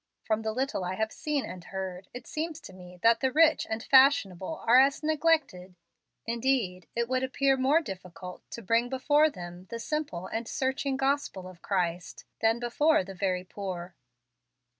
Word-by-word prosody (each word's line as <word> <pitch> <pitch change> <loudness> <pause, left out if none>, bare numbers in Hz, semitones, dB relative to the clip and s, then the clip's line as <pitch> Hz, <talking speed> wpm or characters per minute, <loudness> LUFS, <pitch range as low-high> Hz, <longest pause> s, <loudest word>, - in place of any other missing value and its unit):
From 220 0 0
the 220 0 -2
little 260 -3 -2
I 180 +1 -3
have 220 +2 -1
seen 295 -3 -2
and 180 -2 -8
heard, 190 -1 -6
it 245 0 -9
seems 315 0 -4
to - - -11
me 180 -1 -13
that 230 0 +5
the 260 +1 +1
rich 315 +2 +4
and 220 +1 -3
fashionable 260 - +3
are 240 +3 +7
as 275 +3 +1
neglected 305 - 0 0.5
indeed 230 -7 -1
it 235 0 0
would 255 +1 0
appear 270 +1 +2
more 270 +5 +3
difficult 180 - -9
to 235 - -8
bring 230 +4 +2
before 290 +4 +3
them 175 - -9
the 230 - -5
simple 235 - -3
and 225 +3 -4
searching 265 0 -1
gospel 270 -9 -1
of 185 -2 -13
Christ, 175 -3 -2
than 225 +1 +2
before 245 +2 +2
the 195 +1 -9
very 185 -1 -1
poor." 185 -2 -6
230 Hz, 170 wpm, -28 LUFS, 185-270 Hz, 0.5 s, are